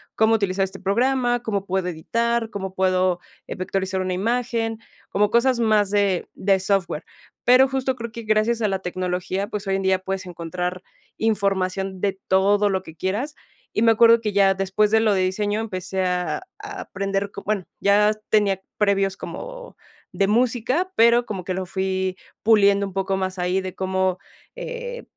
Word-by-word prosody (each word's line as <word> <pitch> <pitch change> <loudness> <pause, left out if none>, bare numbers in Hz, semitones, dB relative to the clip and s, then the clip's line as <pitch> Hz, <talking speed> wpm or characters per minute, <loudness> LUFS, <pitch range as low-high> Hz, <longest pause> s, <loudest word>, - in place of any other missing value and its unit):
¿cómo 220 +1 +4
utilizar 195 -2 0
este 190 - -9
programa, 245 +4 +1
cómo 200 -4 -2
puedo 190 -1 -1
editar, 230 +7 -1
cómo 190 -2 -6
puedo, 185 -1 +2 0.3
eh, - - -5
vectorizar 190 0 -2
una 185 0 -1
imagen?, 230 +2 -1 0.3
como 205 +1 +1
cosas 235 0 +3
más 215 -3 +3
de 200 -3 +1
de 195 0 +2
software. 185 -5 -1 0.4
Pero 255 +2 +6
justo, 265 -1 -1
creo 235 -2 -6
que 230 0 -7
gracias 215 +2 +1
a 215 - +2
la 190 -1 -1
tecnología, 185 +2 -2
pues, 210 -2 -5
hoy 195 - +1
en 195 - -3
día, 190 0 +2
puedes 190 0 -4
encontrar 180 +1 -4 0.3
información 195 -3 0
de 195 -1 -1
todo 200 +2 +3
lo 190 -1 -1
que 160 -2 -12
quieras. 225 +11 -2 0.4
Y 215 - +3
me 230 -1 +6
acuerdo, 230 +1 +6
que 210 -2 -1
ya 195 -1 +4
después 195 +2 +1
de 220 - +4
lo 215 -2 +3
de 190 - +2
diseño, 205 +3 0
empecé 190 -3 -3
a 180 - -1 0.2
a - - -7
aprender, 195 +1 -3
bueno, 205 -3 -1
ya 205 +1 +4 0.2
tenía 200 -3 +2 0.2
previos 195 -2 +1
como - - -8 0.4
de 195 - +1
música, 250 - +1
pero, 235 +1 +5
como 190 -5 -5
que 185 - -3
lo 190 0 -3
fui 190 0 -2 0.3
puliendo 200 -2 +4
un 190 - -10
poco 195 0 -1
más 190 0 -3
ahí, 180 +2 0
de 185 -1 -6
cómo, 190 -1 0 0.4
eh, - - -6
200 Hz, 175 wpm, -23 LUFS, 190-225 Hz, 0.4 s, Pero